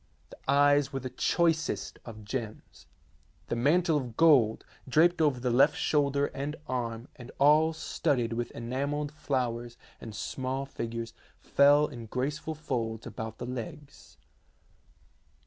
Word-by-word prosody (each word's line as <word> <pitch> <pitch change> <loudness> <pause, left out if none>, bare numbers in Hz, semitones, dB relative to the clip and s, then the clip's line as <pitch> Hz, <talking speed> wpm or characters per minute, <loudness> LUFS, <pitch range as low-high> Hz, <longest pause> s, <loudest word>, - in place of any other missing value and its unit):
The - - -12
eyes 145 0 +4
were 135 - -3
the 130 -1 -6
choicest 160 - 0
of 110 -3 -10
gems. 110 -1 -6 0.6
The - - 0
mantle 160 +6 +3
of 125 -5 -5
gold, 135 -10 +4 0.2
draped 170 +4 +4
over 145 -5 +2
the 125 0 -1
left 140 +5 +4
shoulder 140 -1 +1
and 145 +2 -4
arm, 120 -3 -3
and 125 -1 -10
all 150 +3 +5
studded 145 -6 -1
with 120 +1 -2
enamelled 140 +5 -3
flowers 120 -5 -3 0.2
and 110 -2 -8
small 130 +5 -3
figures, 115 -3 -5 0.3
fell 145 +1 +5
in 115 -5 -8
graceful 145 +6 -3
folds 115 -7 -3
about 110 0 -6
the 120 - -6
legs. 130 +4 -8
130 Hz, 130 wpm, -29 LUFS, 120-150 Hz, 0.6 s, all